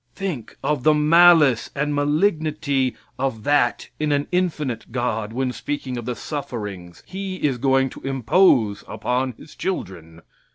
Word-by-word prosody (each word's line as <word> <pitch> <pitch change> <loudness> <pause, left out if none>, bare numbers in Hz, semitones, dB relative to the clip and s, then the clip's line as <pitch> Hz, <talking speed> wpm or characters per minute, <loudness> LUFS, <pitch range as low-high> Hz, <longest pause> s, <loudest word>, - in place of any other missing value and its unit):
Think 170 - -5
of 150 -3 0
the 155 +4 +4
malice 155 -4 +5
and 150 +1 -1
malignity 150 -3 +1 0.2
of 130 -5 -2
that 145 -4 +1
in 155 -1 0
an 145 0 +1
infinite 150 -11 -2
God 115 -3 -2
when 130 +2 -1
speaking 135 -2 -4
of 120 -2 -5
the 125 0 -3
sufferings 105 - -6
He 190 0 -5
is 140 -8 -1
going 135 0 +2
to - - -11
impose 130 - +2
upon 125 +1 -2
His 150 - -15
children. 85 - -5
135 Hz, 140 wpm, -22 LUFS, 120-155 Hz, 0.2 s, malice